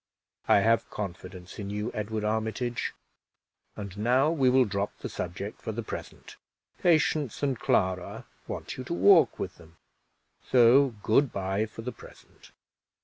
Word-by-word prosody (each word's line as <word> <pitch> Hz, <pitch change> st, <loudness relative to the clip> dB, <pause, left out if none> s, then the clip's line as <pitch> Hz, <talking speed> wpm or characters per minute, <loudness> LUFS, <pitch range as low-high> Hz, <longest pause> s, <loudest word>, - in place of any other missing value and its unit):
"I 100 Hz, -, +5 dB
have 115 Hz, +1 st, +2 dB
confidence 90 Hz, -1 st, -7 dB
in 100 Hz, -1 st, -5 dB
you, 105 Hz, +3 st, -3 dB
Edward 110 Hz, 0 st, -3 dB
Armitage; 110 Hz, +3 st, -2 dB, 0.8 s
and 100 Hz, -2 st, -7 dB
now 130 Hz, +7 st, +3 dB
we 135 Hz, -6 st, +3 dB
will 130 Hz, 0 st, +5 dB
drop 100 Hz, -1 st, -3 dB
the -, -, -6 dB
subject 90 Hz, +4 st, -6 dB
for 110 Hz, -, -4 dB
the 115 Hz, +2 st, -4 dB
present; -, -, -8 dB, 0.4 s
Patience 150 Hz, -6 st, +2 dB
and 135 Hz, -4 st, 0 dB
Clara 90 Hz, -1 st, 0 dB, 0.2 s
want -, -, -6 dB
you 130 Hz, -, -5 dB
to 170 Hz, -, -3 dB
walk 190 Hz, -2 st, +5 dB
with 95 Hz, -1 st, -5 dB
them, 85 Hz, 0 st, -18 dB, 0.7 s
so 125 Hz, +1 st, +5 dB
good 130 Hz, +4 st, +3 dB
by 100 Hz, +2 st, -1 dB
for 115 Hz, +1 st, -10 dB
the 125 Hz, -, -4 dB
present." -, -, -16 dB
110 Hz, 145 wpm, -28 LUFS, 100-130 Hz, 0.8 s, I